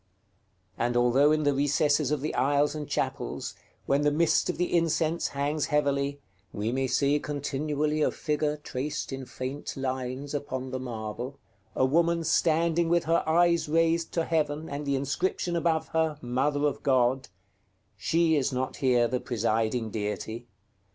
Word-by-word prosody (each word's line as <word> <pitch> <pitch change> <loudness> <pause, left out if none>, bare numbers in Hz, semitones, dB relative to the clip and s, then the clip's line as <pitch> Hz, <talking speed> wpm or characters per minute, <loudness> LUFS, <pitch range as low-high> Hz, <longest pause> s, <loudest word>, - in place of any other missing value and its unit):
And 120 +1 +1
although 125 +5 +4
in 155 0 +2
the 145 -1 +3
recesses 145 0 +2
of 150 -3 0
the 155 - -2
aisles 145 +2 +2
and 150 -2 -6
chapels, - - -3 0.3
when 140 +1 +2
the 145 - +3
mist 160 +2 +2
of - - -2
the 180 +1 0
incense 165 0 +1
hangs 145 +2 -1
heavily, 140 -1 0 0.3
we 105 +3 -2
may 130 +1 0
see 140 +3 +2
continually 150 +1 -2
a - - +3
figure 150 -1 -1
traced 145 0 -4
in 135 -1 -6
faint 130 +4 -5
lines 130 +1 -3
upon 130 -3 -4
their 130 - -3
marble, 120 +2 -5 0.4
a 130 - +3
woman 170 +4 +2
standing 165 +1 +2
with 170 0 +3
her 165 +1 +2
eyes 170 -1 +3
raised 165 +1 +2
to 165 -1 0
heaven, 155 -1 -1
and 145 +1 -5
the 140 - +1
inscription 170 +6 -1
above 165 -1 0
her, 160 -2 0
"Mother 135 +4 0
of 145 - -1
God," 130 -2 +2 0.7
she 165 -1 +2
is 140 -2 +1
not 130 0 -2
here 125 -3 +3
the 125 +2 -1
presiding 115 -2 -1
deity. 110 +3 -4
145 Hz, 160 wpm, -28 LUFS, 130-155 Hz, 0.7 s, although